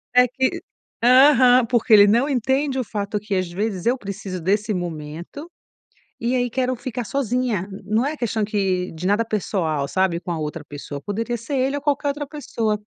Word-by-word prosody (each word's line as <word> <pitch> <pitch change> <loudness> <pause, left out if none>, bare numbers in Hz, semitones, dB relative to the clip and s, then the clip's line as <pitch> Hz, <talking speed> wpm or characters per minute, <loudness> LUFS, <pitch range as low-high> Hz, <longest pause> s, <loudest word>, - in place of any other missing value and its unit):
é 250 - +7
que 260 +2 -1 0.4
aham, 255 -1 +6
porque 235 -2 +2
ele 205 -1 +9
não 235 +7 +3
entende 265 +2 0
o - - 0
fato 205 -1 -3
que 205 -1 -3
às 185 -1 0
vezes 195 0 -3
eu 250 +3 +2
preciso 195 -2 -6
desse 205 +4 0
momento, 170 - -6 0.7
e 240 +2 0
aí 245 -1 +1
quero 255 0 0
ficar 245 -1 -5
sozinha, 245 -7 -1 0.2
não 220 +5 +1
é 305 +2 -2
questão 225 -3 -1
que 190 -4 -1
de 175 +3 -4
nada 210 +3 +2
pessoal 170 -9 -1
sabe 185 -1 +1
com 175 0 -6
a 165 - -2
outra 150 +1 -4
pessoa, 145 0 -8
poderia 230 - -3
ser 230 +5 -5
ele 265 +2 +1
ou - - -5
qualquer 285 0 0
outra 290 0 -3
pessoa, 225 -8 -2
220 Hz, 185 wpm, -22 LUFS, 190-255 Hz, 0.7 s, ele